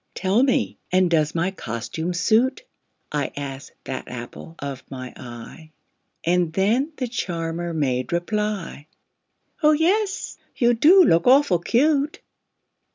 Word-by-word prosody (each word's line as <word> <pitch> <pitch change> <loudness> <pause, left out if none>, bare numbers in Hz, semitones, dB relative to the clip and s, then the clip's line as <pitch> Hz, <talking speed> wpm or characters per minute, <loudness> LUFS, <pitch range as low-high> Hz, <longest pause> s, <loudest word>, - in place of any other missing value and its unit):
"Tell 195 +5 +2
me 265 -1 +1
and 185 -1 +3
does 155 -2 +1
my 175 +3 0
costume 145 +4 -4
suit?" 240 - +2 0.5
I 145 -2 -1
asked 135 -1 -6
that 130 - -6
apple 125 +6 -9
of 135 -2 -6
my 130 -2 -7
eye 125 +6 -10 0.5
And 175 -1 +1
then 230 - +1
the 255 - -2
charmer 170 -6 -3
made 130 -3 -1
reply, 190 -3 -2 0.7
"Oh, 305 0 +5
yes, 380 +6 0 0.2
you 240 -2 +3
do 340 +11 +6
look 170 - +3
awful 255 -9 +5
cute!" 285 - +1
175 Hz, 125 wpm, -23 LUFS, 150-245 Hz, 0.7 s, do